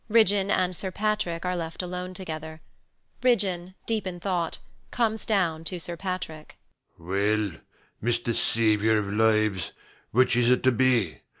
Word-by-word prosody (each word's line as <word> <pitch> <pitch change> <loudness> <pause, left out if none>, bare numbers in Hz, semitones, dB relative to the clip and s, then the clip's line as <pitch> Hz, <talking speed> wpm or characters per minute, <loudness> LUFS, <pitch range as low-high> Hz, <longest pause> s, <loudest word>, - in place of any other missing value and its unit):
Ridgeon 205 -3 +4
and 185 -2 +1
Sir 190 - -2
Patrick 200 -4 -1
are 180 0 0
left 165 +1 -4
alone 180 +1 -5
together. 160 -3 -6 0.6
Ridgeon, 190 -7 +1
deep 220 -4 -1
in 175 -1 -5
thought, 175 -3 -1 0.3
comes 220 -2 0
down 170 -7 +1
to 180 +1 -4
Sir 170 +1 -4
Patrick. 170 -4 -5 0.4
SIR 85 - -19
PATRICK. 100 0 0 0.4
Well, 120 - +2
Mr 120 0 0
Savior 110 -1 +3
of 100 -1 -2
Lives: 110 -5 +2 0.4
which 125 +1 +3
is 120 0 +3
it 125 - +3
to 130 - +5
be? 120 -8 +2
165 Hz, 155 wpm, -27 LUFS, 115-185 Hz, 0.6 s, to